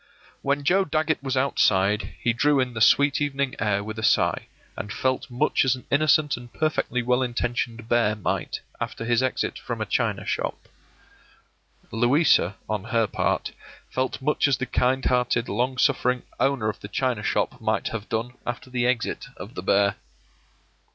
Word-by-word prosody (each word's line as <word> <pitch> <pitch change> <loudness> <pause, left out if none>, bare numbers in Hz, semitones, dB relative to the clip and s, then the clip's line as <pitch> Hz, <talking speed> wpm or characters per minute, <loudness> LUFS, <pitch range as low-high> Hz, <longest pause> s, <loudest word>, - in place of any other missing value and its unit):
When 140 +1 0
Joe 190 +6 +3
Dagget 155 -2 0
was 135 -1 -2
outside 105 -5 +2
he 120 -2 +1
drew 145 +4 +3
in 125 -1 0
the 110 - -4
sweet 140 +6 +4
evening 140 -2 -1
air 100 -1 +1
with 110 +1 -6
a - - -5
sigh, - - +2 0.3
and 105 - -6
felt 130 +4 -1
much 130 +5 +1
as 130 -1 +2
an 125 - -13
innocent 150 0 +3
and 120 0 -11
perfectly 155 -5 -1
well 125 +1 +2
intentioned 120 -2 -2
bear 115 -3 +2
might 105 - -3 0.2
after 115 - -4
his 120 0 +2
exit 130 -1 -1
from - - -5
a - - -1
china - - -1
shop. - - -3 1.2
Louisa, 120 - +3
on 105 -2 -2
her 115 -1 +2
part, - - -1 0.4
felt 130 0 -1
much 150 0 +2
as 135 -4 +2
the 125 - -2
kind 130 +1 +1
hearted, 125 -1 +1
long 125 +5 -1
suffering 125 -2 +2 0.2
owner 135 -5 +1
of 110 - -3
the - - -8
china 125 0 -1
shop - - -1
might 110 -2 0
have 110 -2 -6
done 115 +2 -2
after 120 +1 -5
the 125 -1 +1
exit 125 -2 -1
of 105 - -9
the - - -5
bear. 100 +1 +2
125 Hz, 170 wpm, -25 LUFS, 110-135 Hz, 1.2 s, sweet